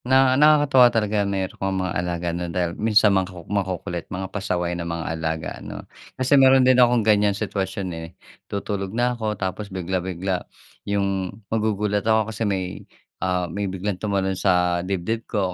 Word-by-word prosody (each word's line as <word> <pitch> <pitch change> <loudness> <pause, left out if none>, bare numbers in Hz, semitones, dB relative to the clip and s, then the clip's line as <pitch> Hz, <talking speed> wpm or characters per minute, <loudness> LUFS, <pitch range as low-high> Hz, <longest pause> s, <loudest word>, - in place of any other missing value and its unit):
Na 130 0 +4
nakakatuwa 145 -3 +6
talaga 105 -3 0
meron 95 -1 -2
kang 95 0 0
mga 90 -2 -2
alaga, 85 0 -2
'no, 85 0 -3
dahil 85 0 -1
minsan 105 -1 +4
mga 95 -1 +1
maku 90 -3 -11
makukulit, 90 -3 -3
mga 95 +1 -5
pasaway 90 -3 -1
ng 85 -1 -4
mga 85 0 -3
alaga, 80 0 -3
ano? - - -8 0.3
Kasi 135 +2 +4
meron 130 -1 +6
din 130 0 +5
akong 120 -3 +4
ganyan 105 -2 +3
sitwasyon, 95 -1 -3
eh, 80 0 -6 0.4
tutulog 100 0 -3
na 125 +1 +2
ako 110 -3 -3
tapos 100 +2 -4
bigla 95 0 -2
bigla, 90 0 -2 0.5
'yung, 100 -2 0 0.2
magugulat 105 -2 0
ako 110 +1 +1
kasi 110 0 -1
may, 95 -2 -3 0.4
ah, 90 -1 0
may 100 +4 -3
biglang 95 0 -4
tumalon 100 -2 0
sa 90 -2 +2
dibdib 95 +4 -2
ko 95 -5 -1
95 Hz, 170 wpm, -23 LUFS, 90-110 Hz, 0.5 s, nakakatuwa